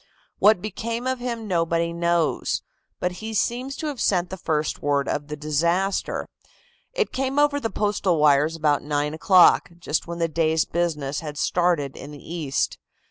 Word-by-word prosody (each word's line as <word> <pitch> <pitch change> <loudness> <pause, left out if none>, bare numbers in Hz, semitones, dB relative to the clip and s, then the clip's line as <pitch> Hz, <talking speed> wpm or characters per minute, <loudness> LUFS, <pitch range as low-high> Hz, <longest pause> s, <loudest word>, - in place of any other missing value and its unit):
What 205 -3 +5
became 230 +3 -4
of 260 -1 -1
him 235 -3 -4
nobody 170 -2 0
knows. 170 -2 0 0.4
But 180 - 0
he 220 0 -5
seems 250 +6 -1
to 315 - -5
have 290 -5 -3
sent 180 -2 +1
the - - -3
first 155 -4 -2
word 140 -1 +1
of 145 0 -2
the 150 - -5
disaster. 170 +6 0 0.6
It - - -1
came 265 +1 -1
over 290 0 +3
the 225 - -2
Postal 205 -5 0
wires 150 +1 +4
about 150 -3 +1
nine 150 0 -1
o'clock, 180 +3 +5
just 165 -2 -2
when 170 0 -5
the 165 -1 +1
day's 160 0 +1
business 150 -5 -2
had 150 -2 -7
started 170 -5 +1
in - - -9
the 150 - -9 0.2
East. 150 -6 -1
170 Hz, 170 wpm, -24 LUFS, 150-215 Hz, 0.6 s, What